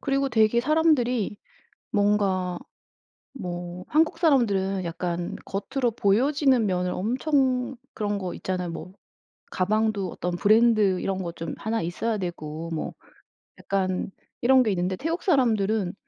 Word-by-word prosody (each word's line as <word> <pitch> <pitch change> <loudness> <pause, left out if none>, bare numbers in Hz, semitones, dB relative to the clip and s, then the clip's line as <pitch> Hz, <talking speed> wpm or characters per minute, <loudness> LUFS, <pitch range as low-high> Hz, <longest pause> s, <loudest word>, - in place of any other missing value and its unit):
그리고 275 -1 0
되게 220 0 +3
사람들이 255 - +2 0.5
뭔가 200 -4 +1 0.8
뭐 175 -5 -6
한국 320 +2 +2
사람들은 200 - +2
약간 175 0 -3
겉으로 235 +5 -1
보여지는 250 +4 +2
면을 180 -1 0
엄청 255 +3 0 0.2
그런 205 -1 -2
거 185 -2 -4
있잖아요. 180 -2 -3
뭐 170 +3 -7 0.6
가방도 205 -1 0
어떤 175 0 -3
브랜드 215 -2 +4
이런 190 -1 -2
거 170 -1 -4
좀 165 0 -6
1 220 -3 -2
있어야 210 +6 -2
되고 165 -2 -5
뭐 155 - -3 0.7
약간 190 -1 -1 0.3
이런 260 +1 +5
게 220 - 0
있는데 185 0 -1
태국 330 +4 -3
사람들은 220 - +2
205 Hz, 265 characters per minute, -25 LUFS, 180-250 Hz, 0.8 s, 이런